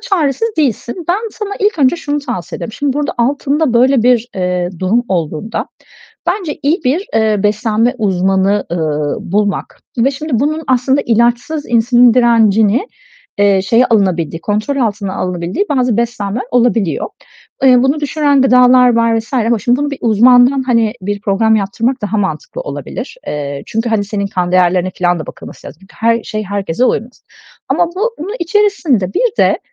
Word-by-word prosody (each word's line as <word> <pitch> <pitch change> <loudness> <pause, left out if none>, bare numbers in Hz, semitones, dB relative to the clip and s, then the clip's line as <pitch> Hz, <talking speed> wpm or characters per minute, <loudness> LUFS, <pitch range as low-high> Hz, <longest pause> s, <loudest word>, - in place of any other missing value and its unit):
çaresiz 335 - 0
değilsin. 275 - -2
Ben 355 - +3
sana, 420 -1 -6
ilk 410 -3 0
önce 280 +4 +3
şunu 295 -3 -3
tavsiye 185 - -5
ederim. 225 - -7
Şimdi 285 +3 -1
burada 290 +1 -2
altında 280 +3 0
böyle 255 0 +4
bir, 245 -1 +2
eee, 180 -2 -1
durum 215 +6 +1
olduğunda 170 +3 -3 0.6
bence 355 -8 -2
iyi 305 +6 +1
bir, 320 - 0
eee, 215 -2 +1
beslenme 215 +3 +1
uzmanı, 195 0 +1
ııı, 150 -3 -1
bulmak 205 +1 -2 0.2
ve 255 +4 +3
şimdi 295 +2 -6
bunun 310 +3 -1
aslında 260 +2 +2
ilaçsız 240 +6 0
insülin 240 0 +4
direncini, 230 - +3 0.5
eee, 200 -1 +3
şeye 230 +6 +3
alınabildiği, 180 -7 0
kontrol 215 +9 -2
altına 210 -6 -2
alınabildiği 180 - -2
bazı 250 -5 +1
beslenmeler 235 -1 -2
olabiliyor. 230 -7 +1 0.6
Eee, 250 -2 +6
bunu 275 +3 +1
düşüren 290 -1 +1
gıdalar 250 -1 +5
var 230 -1 +2
vs. 225 +4 -9
ama 235 -2 +1
şimdi 240 +4 +1
bunu 290 0 -1
bir 280 - -6
uzmandan 245 +4 +4
hani 230 -4 +1
bir 205 +2 -3
program 220 +2 +2
yaptırmak 225 +6 -2
daha 210 +1 -1
mantıklı - - -3
olabilir. - - -7 0.5
Çünkü, 225 +2 -2
hani, 215 -2 +1
senin 200 0 -3
kan 180 -2 -2
değerlerine 185 0 +2
filan 175 -1 0
da - - -7
bakılması - - -11
lazım. 165 - -12
Her 230 0 0
şey 215 0 -5
herkese 200 +1 -2
uymaz. 245 0 -2 0.4
Ama 350 - +2
bu 405 +7 -3
bunun 370 +8 -5
içerisinde 335 - +1
bir 485 -2 0
de - - +3
235 Hz, 155 wpm, -14 LUFS, 200-275 Hz, 0.6 s, Eee